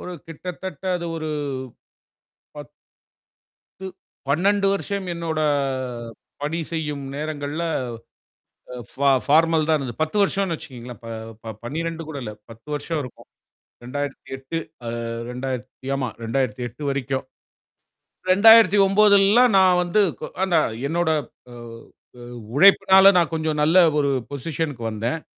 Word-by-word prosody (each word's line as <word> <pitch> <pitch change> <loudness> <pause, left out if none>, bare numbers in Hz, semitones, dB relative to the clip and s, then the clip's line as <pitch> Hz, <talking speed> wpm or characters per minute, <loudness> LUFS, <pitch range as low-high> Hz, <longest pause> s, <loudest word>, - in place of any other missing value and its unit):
ஒரு 180 - -7 0.2
கிட்டத்தட்ட 180 +1 -7
அது 170 -1 -5
ஒரு 155 -1 -4 1.3
10 145 -4 -10 1.6
12 195 +6 +2
வருஷம் 200 -1 -3
என்னோட 165 -2 -3 1.0
பணி 150 +3 -2
செய்யும் 150 -4 -3
நேரங்கள்ல, 150 +1 -4 1.1
அ - - -6 0.2
ஃபா 140 +1 +1 0.2
ஃபார்மல் 160 +1 +3
தான் 155 - +4
இருந்தது. 130 0 -6
10 160 +7 -3
வருஷம்னு 195 -3 0
வச்சுக்கோங்களேன். 125 -7 -10
ப - - -9 0.4
ப 110 -1 -6
12 165 +4 -4
கூட 145 - -6
இல்ல. 105 - -6 0.2
10 115 +6 -16
வருஷம் 155 +2 -3
இருக்கும். 125 - -12 0.6
2008 135 +2 -5 0.3
அ - - -3 0.4
2000த் 130 +1 -6
ஆமா 130 -3 -2 0.2
2008 125 +1 -3
வரைக்கும். 135 -1 -2 1.1
2009லலாம் 205 +2 +6
நான் 185 -1 +5
வந்து 180 +4 +1 0.2
கொ - - -4 0.3
நான் 115 -8 +2
என்னோட 170 +1 0 0.4
அ - - -10 0.7
அ - - -11 0.3
உழைப்பினால, 190 +2 +7
நான் 170 -1 +1
கொஞ்சம் 155 -1 -1
நல்ல 170 +4 +6 0.2
ஒரு 140 -1 +1 0.2
பொசிஷன்குக்கு 140 -4 -3
வந்தேன். 120 +9 -3
155 Hz, 115 wpm, -22 LUFS, 135-180 Hz, 1.6 s, உழைப்பினால